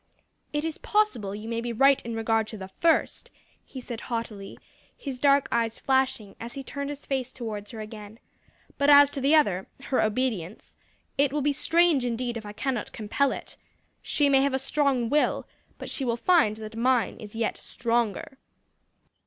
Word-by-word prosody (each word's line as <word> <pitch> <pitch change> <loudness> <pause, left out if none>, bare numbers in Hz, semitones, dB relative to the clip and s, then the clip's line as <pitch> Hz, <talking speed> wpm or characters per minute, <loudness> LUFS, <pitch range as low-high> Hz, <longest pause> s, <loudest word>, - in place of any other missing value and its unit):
"It 295 +1 -1
is 325 -1 -4
possible 415 - 0
you 210 +2 -7
may 230 0 -2
be 240 0 -3
right 275 +4 +4
in 230 -1 -5
regard 225 -1 +1
to 220 - -7
the 190 -1 -8
first," 330 - +1 0.3
he 265 - -9
said 240 -2 -7
haughtily, 225 -5 -5 0.4
his 270 -3 -6
dark 280 0 +4
eyes 230 -1 0
flashing, 265 -6 0
as 235 +1 -7
he 275 - -6
turned 280 +1 -5
his 290 -1 -7
face 260 -2 -2
towards 215 -5 -6
her 225 -2 -7
again, 215 0 -9 0.6
"but 280 +1 +3
as 285 0 +8
to 280 - -5
the 280 +4 +4
other 195 -12 +2 0.2
her 265 - +1
obedience 215 -5 -2 0.4
it 280 -1 +4
will 295 -1 -1
be 290 0 +2
strange 330 -1 +3
indeed 240 0 -2
if 220 -2 -6
I - - -6
cannot 245 +1 -3
compel 230 +6 0
it. - - -7 0.4
She 290 - +1
may 270 -1 +5
have 275 -1 +1
a - - +2
strong 270 -2 +1
will, 295 +5 +1 0.3
but - - -8
she 275 - -3
will 235 -2 0
find 290 -9 +3
that 220 0 -8
mine 245 +1 +1
is 210 0 -10
yet 225 -1 -1
stronger." 235 +2 -2
245 Hz, 185 wpm, -27 LUFS, 220-280 Hz, 0.6 s, as